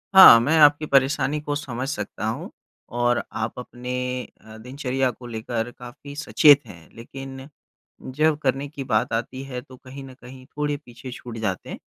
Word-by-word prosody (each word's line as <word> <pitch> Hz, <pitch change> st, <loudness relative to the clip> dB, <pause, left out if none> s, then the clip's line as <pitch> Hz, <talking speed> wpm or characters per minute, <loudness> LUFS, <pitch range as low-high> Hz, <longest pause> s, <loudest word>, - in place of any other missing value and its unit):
हाँ 150 Hz, -11 st, +11 dB
मैं 150 Hz, +7 st, +2 dB
आपकी 150 Hz, 0 st, +6 dB
परेशानी 140 Hz, +1 st, +2 dB
को 145 Hz, -1 st, -3 dB
समझ 130 Hz, -3 st, -4 dB
सकता -, -, -5 dB
हूँ -, -, -4 dB, 0.5 s
और 120 Hz, 0 st, +2 dB
आप 110 Hz, +2 st, -4 dB
अपने 125 Hz, 0 st, -7 dB, 0.5 s
अ, 110 Hz, 0 st, -13 dB
दिनचर्या 130 Hz, +2 st, -2 dB
को 120 Hz, +1 st, -12 dB
लेकर 115 Hz, +1 st, -4 dB
काफ़ी 140 Hz, +4 st, -11 dB
सचेत 145 Hz, -2 st, +5 dB
हैं 85 Hz, -6 st, -14 dB
लेकिन 135 Hz, +3 st, -9 dB, 0.7 s
जब 155 Hz, 0 st, +3 dB
करने 135 Hz, +1 st, 0 dB
की 140 Hz, -1 st, -7 dB
बात 110 Hz, -3 st, 0 dB
आती 120 Hz, +4 st, -3 dB
है 125 Hz, -2 st, -6 dB
तो 130 Hz, 0 st, -15 dB
कहीं 135 Hz, +2 st, -11 dB
न 130 Hz, -, -11 dB
कहीं 130 Hz, +1 st, -12 dB
थोड़े 150 Hz, -1 st, -1 dB
पीछे 120 Hz, +1 st, -10 dB
छूट 120 Hz, -2 st, -9 dB
जाते 95 Hz, -4 st, -3 dB
हैं। -, -, -7 dB
130 Hz, 170 wpm, -23 LUFS, 120-145 Hz, 0.7 s, हाँ